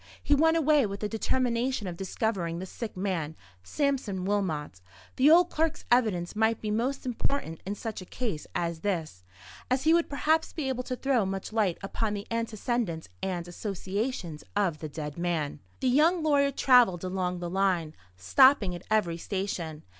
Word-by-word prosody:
He 290 - +3
went 320 +3 +4
away 300 -5 +4
with 200 0 -6
the 210 - 0
determination 240 +1 0
of 180 -2 -4
discovering 190 -2 -2
the 185 - -5
sick 215 +2 -7
man, 175 -5 -2 0.3
Sampson 235 - -1
Wilmot. 160 - -2 0.3
The 270 +3 +5
old 345 +2 +6
clerk's 320 +1 -1
evidence 210 -9 +2
might 220 +1 +2
be 215 - -3
most 250 +6 -1
important 245 - -2
in 200 - -2
such 220 -1 -5
a - - -9
case 205 -8 -4
as 170 -1 -1
this; 160 - -3 0.5
as 255 +1 +1
he 320 +2 +5
would 340 0 +2
perhaps 315 +3 +1
be 305 -4 -3
able 255 -1 -1
to 255 - -3
throw 255 -3 +1
much 195 +2 -4
light 205 -6 +1
upon 210 +2 -2
the 200 - -5
antecedents 230 - -2
and 175 -2 -3
associations 190 -2 -4
of 185 -7 +1
the 155 - -5
dead 150 +1 -6
man. 165 -5 -1 0.2
The 260 - +2
young 315 +6 +4
lawyer 285 -2 +3
travelled 245 -10 +4
along 185 -1 -2
the 175 0 -4
line, 185 -5 +1 0.2
stopping 205 - +5
at 175 - -6
every 200 -6 +1
station. 175 -5 -4
205 Hz, 170 wpm, -28 LUFS, 175-255 Hz, 0.5 s, old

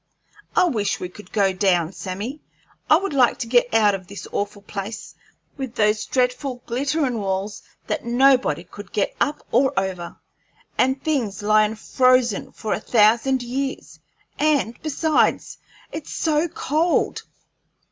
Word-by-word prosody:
I - - +5
wish 220 - 0
we 180 0 -6
would 210 - -13
go 195 -3 +2
down, 180 -3 +2
Sammy; 205 +12 -5 0.5
I 310 - +7
would 390 -2 -3
like 255 -4 +4
to - - -3
get 245 +1 +3
out 215 -2 +4
of 190 -2 -5
this 200 -1 -8
awful 205 0 -3
place, 200 +2 -6 0.4
with 265 -4 -5
those 210 -1 +1
dreadful 250 0 -1
glitterin' 270 0 -1
walls 195 +1 -3 0.2
that - - -2
nobody 245 - +3
could 200 +2 -12
get 205 - 0
up 295 - 0
or 260 -2 +3
over, 185 -3 -4 0.6
and 265 +1 +1
things 235 - -1
lyin' 215 +1 +3
frozen 255 0 +2
for 215 - -3
a - - -1
thousand 235 +4 +3
years; 265 +3 -4 0.4
and, 290 -6 +2
besides, 310 +1 +1 0.3
it's 310 - -7
so 310 +1 +1
cold!" 320 +2 0
235 Hz, 140 wpm, -22 LUFS, 205-270 Hz, 0.6 s, I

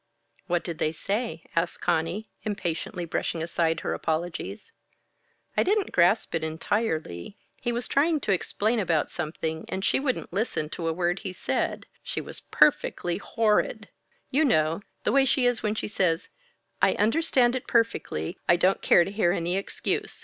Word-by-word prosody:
"What 175 -1 +1
did 170 -3 -5
they 155 - +1
say?" 195 -1 -3
asked 165 +1 0
Conny, 170 +5 0
impatiently 180 -3 -3
brushing 165 0 -2
aside 165 -1 0
her - - -1
apologies. 175 - -3 0.8
"I - - +4
didn't 405 0 +1
grasp 180 +5 +3
it 165 -1 0
entirely. 160 - -2 0.2
He 240 - -2
was 240 +1 -2
trying 310 +3 +2
to - - 0
explain 215 +4 +1
about 170 -6 +1
something, 160 -1 -3
and 190 +1 -3
she - - +2
wouldn't 265 -9 -2
listen 195 -7 -1
to 165 - -3
a - - +2
word 175 +2 0
he 190 -4 -5
said - - -2 0.2
she - - -4
was - - -6
perfectly 180 - +2
horrid. 215 0 +1 0.4
You 290 +4 +3
know, 165 - +2 0.2
the - - +2
way 275 0 +5
she 260 -1 +2
is 245 -1 +2
when 215 0 0
she - - -3
says, 180 -5 0 0.5
'I - - +5
understand 245 +1 +3
it 255 - -4
perfectly. 225 - 0
I 170 - +8
don't 185 +2 +2
care 175 - +6
to 195 - -5
hear 200 -4 +2
any 175 0 -1
excuse. 195 - -2
185 Hz, 165 wpm, -27 LUFS, 165-230 Hz, 0.8 s, I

